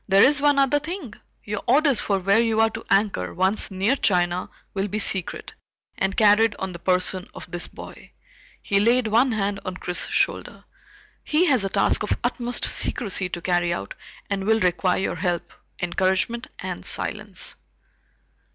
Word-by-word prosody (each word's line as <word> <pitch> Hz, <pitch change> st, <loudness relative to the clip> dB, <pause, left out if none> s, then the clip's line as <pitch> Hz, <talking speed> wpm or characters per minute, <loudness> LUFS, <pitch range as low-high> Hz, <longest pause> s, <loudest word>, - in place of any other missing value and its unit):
"There 195 Hz, 0 st, +5 dB
is 285 Hz, +1 st, +4 dB
one 290 Hz, -1 st, +3 dB
other 275 Hz, +1 st, +3 dB
thing. 305 Hz, -, -6 dB, 0.3 s
Your 210 Hz, 0 st, -4 dB
orders 280 Hz, -1 st, +4 dB
for 200 Hz, -, 0 dB
where 195 Hz, +3 st, +2 dB
you 225 Hz, -1 st, +1 dB
are 225 Hz, 0 st, +4 dB
to 220 Hz, +1 st, -7 dB
anchor, 195 Hz, -, +1 dB
once 190 Hz, +3 st, +1 dB
near 195 Hz, +6 st, +1 dB
China, 180 Hz, -6 st, +1 dB, 0.2 s
will 195 Hz, 0 st, -1 dB
be 205 Hz, -, -3 dB
secret, 190 Hz, -4 st, 0 dB, 0.4 s
and 195 Hz, 0 st, -2 dB
carried 215 Hz, 0 st, +5 dB
on 190 Hz, -1 st, -4 dB
the 175 Hz, -, -9 dB
person 185 Hz, +1 st, 0 dB
of -, -, -10 dB
this 175 Hz, 0 st, -1 dB
boy." -, -, -12 dB, 0.5 s
He 200 Hz, -, +1 dB
laid 235 Hz, +4 st, +3 dB
one 235 Hz, +4 st, +3 dB
hand 200 Hz, -2 st, -1 dB
on 185 Hz, 0 st, -5 dB
Chris's 180 Hz, -1 st, 0 dB
shoulder. -, -, -1 dB, 0.6 s
"He 315 Hz, +4 st, +2 dB
has 255 Hz, -, +3 dB
a 195 Hz, -, -1 dB
task -, -, +1 dB
of 210 Hz, -, -1 dB
utmost 245 Hz, 0 st, -2 dB
secrecy 195 Hz, -5 st, -1 dB
to 175 Hz, -, -5 dB
carry 175 Hz, -1 st, +1 dB
out 100 Hz, -, -4 dB, 0.3 s
and 195 Hz, -1 st, -3 dB
will 220 Hz, +1 st, +3 dB
require 180 Hz, 0 st, +1 dB
your 190 Hz, -, -2 dB
help, 175 Hz, -3 st, -2 dB, 0.3 s
encouragement, 190 Hz, +7 st, 0 dB
and -, -, -6 dB
silence." -, -, -2 dB
200 Hz, 170 wpm, -23 LUFS, 185-235 Hz, 0.6 s, There